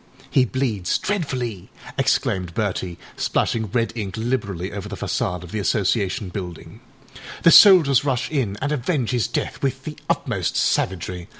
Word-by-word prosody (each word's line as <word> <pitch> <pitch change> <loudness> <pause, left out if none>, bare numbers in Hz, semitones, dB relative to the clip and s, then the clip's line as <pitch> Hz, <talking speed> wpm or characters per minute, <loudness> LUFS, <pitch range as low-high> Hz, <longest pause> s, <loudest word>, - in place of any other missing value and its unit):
â 130 - +5
âHe - - -18
bleeds 115 -9 0
dreadfully,â 130 - -4
exclaimed 90 -3 0
Bertie, 95 -4 -2 0.2
splashing 110 -2 0
red 115 +3 0
ink 100 -4 -4
liberally 105 -6 -2
over 100 0 -6
the 100 - -5
façade 90 +1 -2
of 90 - -11
the 110 - -2
Association 100 -1 0
building. 90 -3 -7 0.6
âThe 165 - +7
soldiers 160 - +8
rush 130 -3 0
in 120 -10 -1
and 145 - -1
avenge 140 -3 -1
his 120 -6 +1
death - - -3
with 135 -1 -2
the 150 - -6
utmost - - -1
savagery. 90 -1 -1
110 Hz, 155 wpm, -22 LUFS, 95-130 Hz, 0.6 s, soldiers